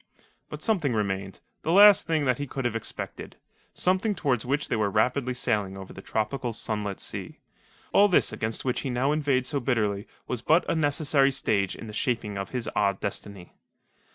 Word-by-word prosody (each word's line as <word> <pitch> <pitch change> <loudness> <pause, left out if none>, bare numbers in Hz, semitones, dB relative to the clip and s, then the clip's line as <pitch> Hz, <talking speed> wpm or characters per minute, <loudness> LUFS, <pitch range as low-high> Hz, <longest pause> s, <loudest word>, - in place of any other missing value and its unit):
But - - -8
something 170 - +1
remained 95 -2 -2 0.2
the 160 - -1
last 205 +2 +7
thing 160 -3 +1
that 125 -1 +1
he 145 - -3
could 135 -1 -4
have 120 -2 0
expected 115 - -6 0.4
something 190 +3 +1
towards 135 - 0
which 145 +3 0
they - - 0
were 105 -2 +1
rapidly 125 +4 +1
sailing 100 -5 -1
over 95 -1 -9
the 95 - -10
tropical, 115 +4 -2
sunlit 105 -3 -2
sea. - - -5 0.6
All 205 +1 +6
this 180 - +2
against 110 +3 -3
which 125 - 0
he 135 - -3
now 130 +3 +1
inveighed 140 -4 +1
so 140 +1 -1
bitterly 110 -5 -1 0.2
was 125 -3 -3
but 160 +7 +3
a - - +1
necessary 145 -3 +2
stage 105 -8 0
in - - -9
the 105 - -8
shaping 115 -3 -1
of 100 0 -4
his 125 -3 -4
odd 100 -2 +1
destiny. 100 -2 -5
125 Hz, 185 wpm, -26 LUFS, 105-145 Hz, 0.6 s, last